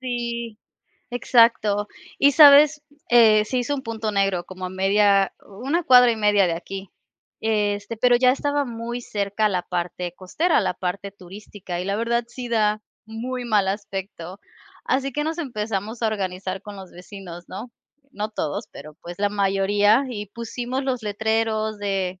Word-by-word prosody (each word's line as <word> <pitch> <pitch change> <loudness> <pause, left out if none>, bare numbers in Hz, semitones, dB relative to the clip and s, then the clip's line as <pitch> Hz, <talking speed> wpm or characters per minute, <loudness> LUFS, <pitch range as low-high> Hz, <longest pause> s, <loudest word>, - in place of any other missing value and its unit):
Sí, 235 -3 -4 0.5
exacto. 230 -4 +3 0.3
¿Y 285 +1 +5
sabes?, 295 +1 +7 0.3
eh, 220 -3 +6
se 255 +4 -2
hizo 245 +4 -1
un 275 - -5
punto 220 -2 -4
negro 195 -3 0
como 185 +1 -9
a - - -6
media, 195 +1 +3
u 205 +6 -11
una 335 +5 +1
cuadra 250 -5 +7
y 230 - -1
media 205 -2 +3
de 170 - 0
aquí, 190 +2 -8 0.5
este, 210 -1 -1
pero 245 +2 +4
ya 250 +1 +4
estaba 285 +2 0
muy 235 0 -5
cerca 205 0 -1
a - - +4
la 185 -3 -1
parte 175 0 -4
costera, 315 - 0
a - - +3
la - - -1
parte 195 +2 -4
turística, 190 -1 -8
y - - -4
la 200 +1 -1
verdad 235 +1 0
sí 245 +1 -8
da 215 -2 +1 0.3
muy 245 +3 -5
mal 210 -5 +2
aspecto. 195 -2 -6 0.4
Así 270 +1 0
que 295 +3 -2
nos 320 +2 -3
empezamos 220 - -4
a - - +3
organizar 190 -3 -3
con 205 -1 -9
los 190 -2 -11
vecinos, 180 -1 -10
¿no?, 235 +6 -8 0.5
no 210 +1 -2
todos, 155 -8 -4
pero, 150 +2 -11
pues, 175 0 -9
la 205 0 +2
mayoría, 205 +4 +2
y 210 -4 -5
pusimos 240 +5 -5
los 255 -3 -2
letreros 220 0 -1
de 190 -2 -2
210 Hz, 170 wpm, -23 LUFS, 195-240 Hz, 0.5 s, sabes